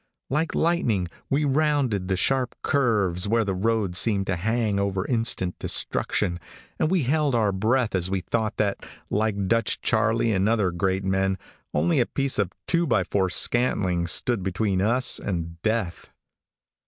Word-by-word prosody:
Like 155 Hz, +4 st, 0 dB
lightning 120 Hz, -, +1 dB, 0.2 s
we 145 Hz, +2 st, +1 dB
rounded 140 Hz, -9 st, +1 dB
the 95 Hz, -1 st, 0 dB
sharp 130 Hz, +4 st, 0 dB
curves 105 Hz, -9 st, +1 dB
where 115 Hz, +2 st, +2 dB
the 100 Hz, -2 st, -2 dB
road 105 Hz, -1 st, 0 dB
seemed 100 Hz, 0 st, +2 dB
to 95 Hz, -, -1 dB
hang 110 Hz, +2 st, 0 dB
over 100 Hz, -1 st, -1 dB
instant 115 Hz, -7 st, +1 dB
destruction, 85 Hz, -4 st, -1 dB, 0.4 s
and 155 Hz, -, +2 dB
we 180 Hz, -4 st, +2 dB
held 145 Hz, 0 st, +1 dB
our 110 Hz, -3 st, +2 dB
breath 110 Hz, +5 st, 0 dB
as 95 Hz, -1 st, 0 dB
we 95 Hz, -1 st, -1 dB
thought 110 Hz, +2 st, -2 dB
that, 100 Hz, -2 st, -1 dB, 0.3 s
like 100 Hz, -2 st, 0 dB
Dutch 115 Hz, +3 st, +1 dB
Charlie 115 Hz, 0 st, +1 dB
and 95 Hz, +2 st, +1 dB
other 105 Hz, -5 st, +1 dB
great 95 Hz, +2 st, -1 dB
men, 95 Hz, 0 st, 0 dB, 0.3 s
only 85 Hz, -, +1 dB
a 120 Hz, -, +2 dB
piece 135 Hz, -4 st, -1 dB
of 100 Hz, -3 st, 0 dB
two 170 Hz, -1 st, +1 dB
by 110 Hz, -7 st, +2 dB
four 95 Hz, +1 st, 0 dB
scantling 90 Hz, -5 st, +1 dB
stood 120 Hz, +4 st, +2 dB
between 95 Hz, +1 st, -1 dB
us 120 Hz, +5 st, +2 dB
and 85 Hz, -3 st, -4 dB
death. 110 Hz, -6 st, -2 dB
105 Hz, 160 wpm, -24 LUFS, 95-120 Hz, 0.4 s, where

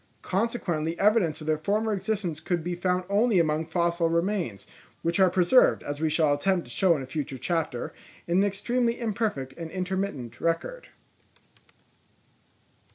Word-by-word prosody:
Consequently 180 Hz, -6 st, -1 dB
evidence 195 Hz, -7 st, +2 dB
of -, -, -7 dB
their 155 Hz, -1 st, +1 dB
former 210 Hz, +6 st, 0 dB
existence 195 Hz, -5 st, -2 dB
could 175 Hz, -3 st, -2 dB
be 175 Hz, +1 st, -2 dB
found 180 Hz, +1 st, 0 dB
only 205 Hz, +2 st, +3 dB
among 160 Hz, -1 st, +1 dB
fossil 170 Hz, -1 st, +1 dB
remains, 170 Hz, -, -1 dB, 0.4 s
which 170 Hz, +3 st, 0 dB
are 190 Hz, -1 st, +6 dB
preserved, 185 Hz, +8 st, +4 dB
as 145 Hz, +1 st, -5 dB
we 160 Hz, -, +2 dB
shall 155 Hz, -1 st, +3 dB
attempt 175 Hz, +5 st, +1 dB
to -, -, -11 dB
show 185 Hz, -4 st, +3 dB
in 135 Hz, -, -5 dB
a -, -, -6 dB
future 135 Hz, -1 st, -4 dB
chapter, 160 Hz, -4 st, -2 dB, 0.3 s
in 170 Hz, +1 st, +1 dB
an -, -, +4 dB
extremely 235 Hz, +5 st, 0 dB
imperfect 210 Hz, -, -2 dB
and 165 Hz, -1 st, -6 dB
intermittent 180 Hz, -, -4 dB
record. 165 Hz, -, -2 dB
175 Hz, 155 wpm, -27 LUFS, 155-200 Hz, 0.4 s, are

